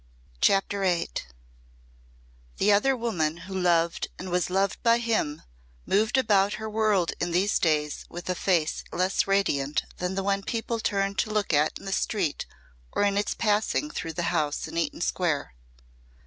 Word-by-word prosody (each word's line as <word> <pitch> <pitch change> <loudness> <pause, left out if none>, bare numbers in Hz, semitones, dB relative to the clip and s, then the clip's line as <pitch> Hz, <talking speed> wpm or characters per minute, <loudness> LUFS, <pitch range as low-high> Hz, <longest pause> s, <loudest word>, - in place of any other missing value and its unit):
CHAPTER 200 0 +2
VIII 180 -3 +1 1.5
The 210 - +3
other 255 +6 +3
woman 170 -10 -1
who 195 - -8
loved 170 -2 +1
and 185 0 -6
was 180 0 +1
loved 195 +2 0
by 230 -1 +4
him 225 -11 -1 0.4
moved 220 +6 +2
about 205 -5 +3
her 220 - -5
world 215 -5 +1
in 175 - -1
these 185 +4 +2
days 150 -3 0
with 175 +1 -8
a 185 - +1
face 170 -4 0
less 185 +2 +1
radiant 150 -8 +1
than 180 +1 -2
the 195 - -1
one 200 0 +1
people 230 +2 -3
turned 195 -2 -1
to - - +1
look 210 -4 0
at 150 +1 +2
in - - -13
the 195 - -4
street 185 -9 -1 0.4
or - - +1
in 200 -1 +2
its 205 0 0
passing 220 +7 +1
through 165 -1 -4
the 175 - -2
house 150 -3 -1
in 160 - -9
Eaton 170 0 -1
Square. 165 - -1
195 Hz, 165 wpm, -27 LUFS, 170-210 Hz, 1.5 s, by